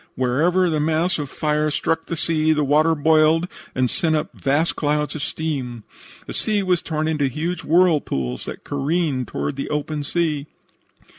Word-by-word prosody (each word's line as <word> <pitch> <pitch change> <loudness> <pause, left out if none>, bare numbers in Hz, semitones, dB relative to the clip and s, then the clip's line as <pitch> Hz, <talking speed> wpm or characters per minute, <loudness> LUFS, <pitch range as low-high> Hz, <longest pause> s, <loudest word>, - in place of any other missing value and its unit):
"Wherever 160 +9 +2
the 155 -3 0
mass 160 +3 +1
of 145 -2 -4
fire 150 +1 0
struck 160 +2 -1
the 170 - -3
sea 155 0 +2
the 150 -1 +1
water 155 +3 +3
boiled 160 +2 +3 0.3
and 130 0 +2
sent 160 +5 +1
up 150 - -2
vast 145 +4 0
clouds 150 0 0
of 155 - -5
steam. 135 -8 -3 0.4
The - - -7
sea 210 -2 +1
was 180 -2 +1
torn 155 -1 -2
into 150 -3 +1
huge 165 +7 -3
whirlpools 150 - +1
that - - -7
careened 145 -2 -1
toward 145 - -3
the 140 - -4
open 150 0 -2
sea. 150 -1 -1
155 Hz, 165 wpm, -22 LUFS, 145-165 Hz, 0.4 s, water